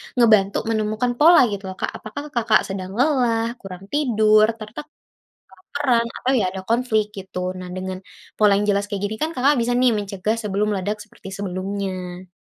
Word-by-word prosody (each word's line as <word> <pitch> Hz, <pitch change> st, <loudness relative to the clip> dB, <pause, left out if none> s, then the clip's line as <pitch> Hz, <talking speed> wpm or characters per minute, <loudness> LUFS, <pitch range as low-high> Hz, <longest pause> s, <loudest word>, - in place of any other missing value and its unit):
ngebantu 215 Hz, -5 st, +4 dB
menemukan 220 Hz, +2 st, 0 dB
pola 335 Hz, +5 st, +7 dB
gitu 200 Hz, -1 st, -5 dB
loh 190 Hz, -, -5 dB
Kak -, -, -1 dB
apakah 215 Hz, +7 st, -7 dB
Kakak 225 Hz, -2 st, +3 dB
sedang 190 Hz, -1 st, -5 dB
lelah, 250 Hz, -5 st, +2 dB, 0.2 s
kurang 190 Hz, -2 st, -9 dB
tidur 215 Hz, -7 st, +4 dB
tertekan, 215 Hz, +6 st, -8 dB, 0.6 s
kelaparan 235 Hz, +5 st, -1 dB
atau 260 Hz, -, 0 dB
ya 210 Hz, -, +1 dB
ada 190 Hz, 0 st, -6 dB
konflik 230 Hz, -2 st, +2 dB
gitu. 190 Hz, -1 st, -7 dB, 0.2 s
Nah 180 Hz, 0 st, -7 dB
dengan 185 Hz, 0 st, -4 dB, 0.4 s
pola 210 Hz, -1 st, +5 dB
yang 205 Hz, -, 0 dB
jelas 200 Hz, 0 st, +1 dB
kaya 200 Hz, -, -2 dB
gini 205 Hz, +2 st, -2 dB
kan 315 Hz, -, 0 dB
Kakak 270 Hz, +3 st, +3 dB
bisa 235 Hz, -, -1 dB
nih 255 Hz, -1 st, +5 dB
mencegah 200 Hz, +1 st, -2 dB
sebelum 205 Hz, 0 st, 0 dB
meledak 205 Hz, +2 st, -2 dB
seperti 210 Hz, -, -13 dB
sebelumnya. 185 Hz, -1 st, -4 dB
215 Hz, 170 wpm, -22 LUFS, 195-235 Hz, 0.6 s, pola